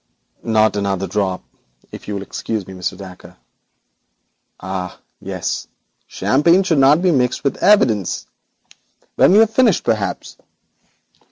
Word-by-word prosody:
'Not 110 -2 +2
another 100 -1 -1
drop, 95 -3 -2 0.5
if - - -11
you 105 - -4
will 100 - -4
excuse 105 0 -5
me, 95 - -11
Mr. 90 0 -4
Dacre.' 95 -2 -12 1.2
'Ah, 95 -1 -6 0.2
yes, - - -4 0.4
champagne 170 +8 +2
should 165 -6 +1
not 145 +6 +4
be 185 - +3
mixed 125 -5 0
with 140 - -1
evidence. 115 - +2 0.9
When - - +4
we - - +6
have 220 0 +5
finished, 230 -6 +2
perhaps. 105 -4 -3
110 Hz, 125 wpm, -18 LUFS, 95-165 Hz, 1.2 s, we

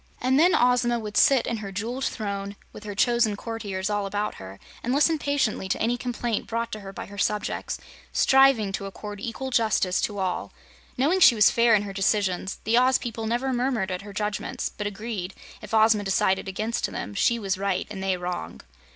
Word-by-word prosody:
And 260 +2 +2
then 350 +3 +5
Ozma 245 -1 +3
would 210 -2 -6
sit 270 -4 +5
in 230 - -2
her 200 -2 -6
jeweled 235 +7 -3
throne, 200 -2 -4 0.2
with 210 - -11
her 205 -1 -5
chosen 235 -1 +2
courtiers 205 -3 -4
all 205 -1 -1
about 205 +1 -2
her, 95 +1 -10 0.2
and 245 +3 -1
listen 305 +2 +3
patiently 275 -10 0
to - - 0
any 235 +2 +1
complaint 240 -2 -3
brought 230 0 -2
to 215 - -5
her 195 -1 -9
by - - -7
her 200 0 -10
subjects, 210 +1 -1 0.3
striving 265 -6 +4
to 195 0 -4
accord 205 +1 -8
equal 240 +5 -5
justice 215 -6 +2
to 205 - -2
all. 185 -2 -2 0.4
Knowing 305 +9 +2
she 250 - +8
was 210 -2 +6
fair 235 -1 +4
in 205 - +1
her 200 -1 -6
decisions, 195 -1 0
the 230 +3 +3
Oz 255 +1 +4
people 225 -2 -5
never 250 +4 0
murmured 240 -6 0
at 180 0 -3
her 205 0 -10
judgments, 210 0 -3
but 210 - -3
agreed, 205 -2 -5 0.3
if - - -10
Ozma 220 -1 +4
decided 190 0 +1
against 215 +4 -2
them, 100 - -5
she 235 - +2
was 195 -3 -2
right 195 -1 -1
and 195 -2 -6
they 190 -1 0
wrong. 180 0 -5
215 Hz, 200 wpm, -25 LUFS, 195-240 Hz, 0.4 s, she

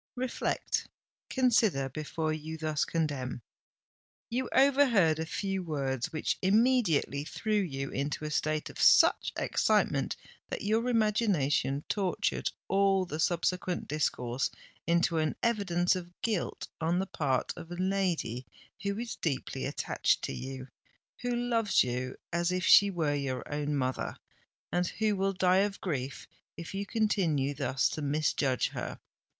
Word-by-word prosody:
Reflect—consider 240 - 0
before 155 +2 -3
you 155 +1 -5
thus 155 -1 0
condemn! 140 -7 -2 0.9
You 250 +1 -1
overheard 255 - +4
a 160 - -2
few 195 +4 -2
words 135 -7 -2
which 155 - -1
immediately 200 - +3
threw 215 +7 -3
you 135 -7 -4
into 145 +3 -2
a 150 - -3
state 155 0 -1
of - - -7
such - - +6
excitement - - +1 0.3
that - - -4
your 225 +4 +1
imagination 200 - +1
tortured 195 -4 0 0.2
all 195 -1 +3
the 155 -3 -5
subsequent 180 +2 0
discourse 130 -4 -1 0.4
into 170 -1 +2
an 155 -1 0
evidence 185 -6 +2
of 175 -1 -8
guilt 215 -7 -2
on 165 +2 +1
the 190 - 0
part 140 -8 -1
of 170 -2 -9
a - - -4
lady 180 - -1 0.3
who 200 0 -2
is 235 0 -4
deeply 140 -6 -2
attached - - 0
to - - -2
you—who 135 - -7
loves 235 -3 +2
you 125 +1 -3 0.2
as 170 +1 +1
if 185 0 -1
she 200 0 +8
were 165 -6 0
your 140 -3 -2
own 145 0 -1
mother—and 140 +6 -4
who 215 +1 0
will 195 0 0
die 185 0 +3
of 200 +1 +1
grief 140 -7 -4 0.3
if 170 +2 -7
you 200 +1 -3
continue 175 -12 +1
thus 135 -1 +1
to 155 - -5
misjudge 145 -3 +1
her. - - -5
170 Hz, 135 wpm, -30 LUFS, 145-200 Hz, 0.9 s, she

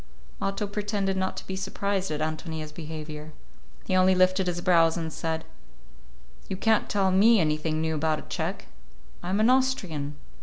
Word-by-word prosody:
Otto 195 +2 -1
pretended 205 -1 -1
not 190 0 -1
to - - -6
be 190 - -4
surprised 195 0 -2
at 150 -1 -3
Ántonia's 155 0 -3
behavior. 155 -1 -7 0.5
He 185 - 0
only 185 0 +5
lifted 185 +1 +3
his 175 -1 -1
brows 170 -2 +4
and 160 -2 -3
said, 160 -1 -3 1.0
"You 190 - -2
can't 220 +2 +2
tell 195 -2 +2
me 215 +4 +6
anything 155 -1 0
new 160 0 0
about 155 0 +1
a - - -8
Czech; - - -4 0.6
I'm 185 +3 -1
an 225 +3 +5
Austrian." 185 - 0
180 Hz, 160 wpm, -27 LUFS, 155-195 Hz, 1.0 s, me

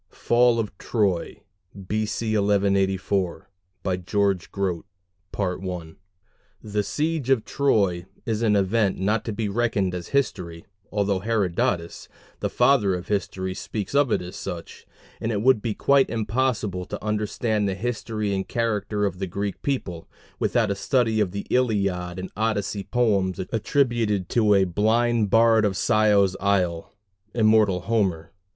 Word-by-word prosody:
FALL 120 0 +3
OF 105 -4 -3
TROY 100 -5 -1 0.5
B.C. 110 +1 -1
1184 100 -2 +1 0.6
GEORGE 100 -1 0
GROTE 95 -4 -2 1.8
The 105 -1 -1
siege 155 +1 -2
of 130 -5 +3
Troy 100 -11 +1 0.2
is 110 -1 -1
an 110 -3 +3
event 100 +1 +1
not 105 +3 0
to 115 - -2
be 110 0 -2
reckoned 100 -3 0
as 90 -1 -5
history, 90 -12 -2 0.3
although 100 -2 0
Herodotus, 95 -5 -1 0.3
the - - -1
"Father 120 -7 +3
of 90 0 -7
History," 95 -2 -2
speaks 105 +3 -5
of 140 -3 +3
it - - +1
as 90 +2 -8
such, 90 -4 -7 0.3
and 115 - -2
it 105 -1 -1
would 130 -4 +4
be 110 -2 -2
quite 140 -1 +3
impossible 110 -4 -1
to - - -7
understand 105 0 0
the 95 - -2
history 110 -2 -3
and 95 -1 -2
character 105 -3 -1
of 90 -2 -3
the 95 - -2
Greek 100 +3 -4
people 90 -12 -3 0.3
without 115 -4 +1
a - - 0
study 115 +2 +1
of 105 -3 +2
the 100 +2 -5
Iliad 100 -8 0
and 95 0 -6
Odyssey 105 -2 -1
poems 100 -7 +1
attributed 115 -1 0
to 105 -3 +3
"a 95 - +4
blind 110 +4 +1
bard 115 +1 +5
of 100 -3 0
Scio's 105 -4 +3
isle" 90 -4 0 0.4
immortal 110 -5 +4
Homer. 95 -8 -1
105 Hz, 140 wpm, -24 LUFS, 95-115 Hz, 1.8 s, bard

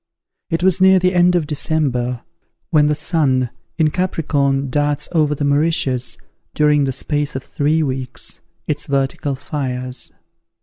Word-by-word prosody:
It 165 +2 -1
was 190 0 +3
near 190 0 +7
the 185 0 +2
end 180 0 +4
of 170 -3 +1
December, 135 -5 -1 0.5
when 150 -3 +4
the 150 - +2
sun, 140 -6 +1 0.3
in 155 -2 +3
Capricorn, 140 -7 0
darts 145 +1 0
over 150 -3 +2
the 145 - -2
Mauritius, 140 -4 +1 0.4
during 150 -1 +3
the 135 - 0
space 145 +2 -2
of 135 - -3
three 155 +2 0
weeks, 130 -2 -2 0.2
its 150 -1 -2
vertical 140 0 -1
fires. 130 -3 -4
145 Hz, 140 wpm, -19 LUFS, 135-160 Hz, 0.5 s, near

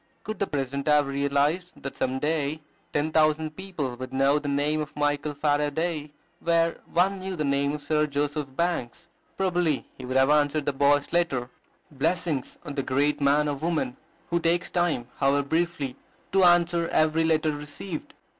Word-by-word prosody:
Could 215 +1 -5
the 200 - 0
president 140 0 -3
have 150 -1 +5
realized 140 +6 0
that 140 - -5
some 130 0 -1
day 150 +1 -1 0.3
ten 150 +2 0
thousand 155 0 +2
people 160 -10 -4
would 130 0 -6
know 135 +2 +3
the 145 - -6
name 145 +2 +1
of 150 0 -6
Michael 145 0 0
Faraday 150 +1 0 0.3
where 165 0 +1
one 190 +3 +2
knew 190 0 -4
the 155 -3 -1
name 140 +1 +1
of 150 -1 -5
Sir 150 +1 +1
Joseph 145 0 -1
Banks, 170 -8 -2 0.3
probably 175 -6 +1
he 130 - -9
would 130 +1 0
have 135 +2 +5
answered 150 0 +2
the 145 - 0
boy's 145 +2 +2
letter. 135 -8 0 0.4
Blessings 150 0 -1
on 145 - -5
the 140 - -1
great 140 +3 +1
man 145 +2 +3
or 145 - 0
woman 155 -3 -1 0.4
who 170 - +2
takes 170 +2 +1
time, 175 -9 0
however 140 +1 +2
briefly, 160 -5 -1 0.4
to 190 -1 +5
answer 175 -1 +4
every 155 0 +2
letter 160 -1 +2
received! 150 +4 -7
150 Hz, 170 wpm, -26 LUFS, 140-165 Hz, 0.4 s, have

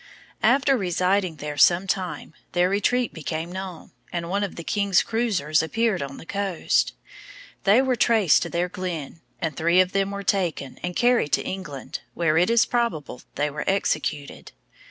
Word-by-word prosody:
After 275 0 +4
residing 185 -3 0
there 150 0 -6
some 175 +6 +5
time, 185 -4 -3 0.2
their 180 0 +3
retreat 240 +5 +1
became 160 +1 -4
known, 185 -2 -7 0.2
and 170 0 -4
one 200 +1 0
of 200 - -4
the 170 - -7
king's 200 0 +2
cruizers 200 -10 +1
appeared 220 +4 0
on 140 0 -6
the - - -11
coast. 195 -2 0 0.7
They 215 +6 +5
were 260 -1 +1
traced 220 - +4
to - - -3
their 175 +1 0
glen, 175 -4 -5 0.2
and 160 -3 -2
three 170 +3 +3
of 185 0 +3
them 195 0 0
were 200 0 -5
taken, 175 -9 -1
and 180 0 -4
carried 240 - +2
to - - +3
England, 150 -8 -6 0.2
where 160 -2 +1
it 180 - +3
is 230 -1 +4
probable 185 - -2
they 150 +1 0
were 150 +1 -4
executed. 150 -6 -2
180 Hz, 170 wpm, -24 LUFS, 160-200 Hz, 0.7 s, some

